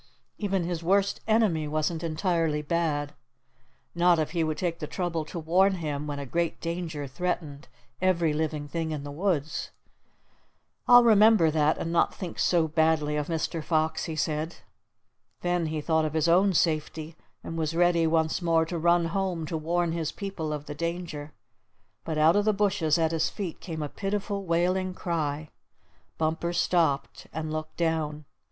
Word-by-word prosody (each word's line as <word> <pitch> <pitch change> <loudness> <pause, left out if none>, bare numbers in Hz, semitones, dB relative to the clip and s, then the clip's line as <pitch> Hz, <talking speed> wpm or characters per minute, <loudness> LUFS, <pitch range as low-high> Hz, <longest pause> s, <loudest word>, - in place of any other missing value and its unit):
Even 195 -3 0
his 170 -1 -3
worst 195 +3 +2
enemy 210 -9 +2
wasn't 155 +2 -1
entirely 165 -2 0
bad, 150 -2 -1 0.8
not 175 0 +4
if 155 -1 -1
he 170 -2 0
would 155 -1 -1
take 170 -1 -2
the 150 - -4
trouble 170 -3 -2
to 175 - -8
warn 185 +4 +3
him 150 -4 -3
when 145 -1 -4
a 140 - -5
great 170 +5 -1
danger 165 -3 -4
threatened 150 -1 -4 0.3
every 170 -4 +2
living 150 -1 -2
thing 165 +2 -3
in 150 -2 -4
the 145 - -6
woods. 155 -2 -1 1.2
"I'll 245 0 +9
remember 215 -6 +6
that, 155 0 +2
and 165 - -3
not 170 - +2
think 180 -4 -6
so 170 -3 +3
badly 155 -1 +2
of 150 -1 -1
Mr. 165 -1 -2
Fox," 160 0 0
he 160 - -4
said. 155 +2 -2 0.9
Then 175 -2 0
he 155 -1 -3
thought 160 0 +1
of 155 0 -3
his 160 0 +2
own 185 +3 +4
safety, 160 -1 0 0.3
and 165 - -6
was 160 0 -2
ready 170 -1 +3
once 160 +1 +1
more 165 -1 +3
to 170 +1 -4
run 170 +1 +3
home 175 -1 -2
to 165 - -4
warn 170 +2 0
his 165 -2 -2
people 190 -6 -5
of 150 -1 -4
the 145 - -6
danger; 170 -2 -4 0.7
but 160 -2 -3
out 155 +2 +5
of 205 0 +2
the 215 - +3
bushes 195 -6 +2
at 165 -1 +1
his 165 -1 +1
feet 190 -6 -5
came 160 -3 -5
a - - -2
pitiful 200 +3 -3
wailing 180 +2 +1
cry. 155 -4 -2 0.7
Bumper 165 +2 -1
stopped, 160 -6 0
and 155 -1 -4
looked 155 0 -5
down. 155 -3 -1
165 Hz, 170 wpm, -27 LUFS, 155-175 Hz, 1.2 s, I'll